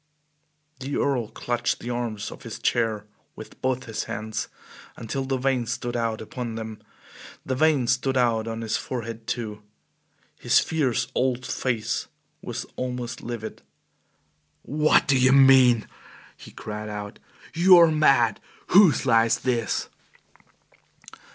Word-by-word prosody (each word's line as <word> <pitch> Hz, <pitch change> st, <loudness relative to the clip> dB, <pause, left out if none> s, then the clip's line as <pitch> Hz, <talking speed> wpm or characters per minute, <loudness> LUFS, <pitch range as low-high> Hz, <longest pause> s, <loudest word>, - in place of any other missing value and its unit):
The 135 Hz, +2 st, -4 dB
Earl 125 Hz, -6 st, 0 dB
clutched 120 Hz, +1 st, -2 dB
the 120 Hz, -, -5 dB
arms 115 Hz, -4 st, -4 dB
of -, -, -11 dB
his -, -, -7 dB
chair 110 Hz, -3 st, 0 dB, 0.3 s
with -, -, -12 dB
both 130 Hz, -1 st, -1 dB
his 115 Hz, -2 st, -5 dB
hands 110 Hz, 0 st, -4 dB, 0.5 s
until 130 Hz, +4 st, -4 dB
the 135 Hz, 0 st, -1 dB
veins 125 Hz, -2 st, 0 dB
stood 120 Hz, -1 st, -5 dB
out 115 Hz, -2 st, -1 dB
upon 115 Hz, +1 st, -6 dB
them; 110 Hz, -1 st, -7 dB, 0.6 s
the 130 Hz, -, -2 dB
veins 135 Hz, -3 st, +2 dB
stood 130 Hz, +1 st, 0 dB
out 115 Hz, -3 st, +1 dB
on 115 Hz, 0 st, -4 dB
his 110 Hz, -1 st, -1 dB
forehead 115 Hz, -2 st, -6 dB
too; 110 Hz, -3 st, -4 dB, 0.8 s
his -, -, +3 dB
fierce 145 Hz, -7 st, +1 dB
old 130 Hz, 0 st, 0 dB
face 115 Hz, -3 st, -2 dB, 0.3 s
was -, -, -5 dB
almost 125 Hz, -1 st, -4 dB
livid. 115 Hz, -2 st, -6 dB, 1.0 s
"What 150 Hz, +2 st, +2 dB
do 135 Hz, -, +3 dB
you 130 Hz, 0 st, +4 dB
mean!" 130 Hz, -4 st, +6 dB, 0.5 s
he -, -, -13 dB
cried 105 Hz, 0 st, -7 dB
out. 105 Hz, -1 st, -7 dB, 0.3 s
"You 180 Hz, +2 st, +7 dB
are 170 Hz, -2 st, +6 dB
mad! 135 Hz, -8 st, +3 dB, 0.3 s
Whose 185 Hz, -7 st, +5 dB
lie 115 Hz, -3 st, +4 dB
is 115 Hz, -, +1 dB
this?" 120 Hz, -3 st, -1 dB
120 Hz, 135 wpm, -25 LUFS, 115-130 Hz, 1.0 s, You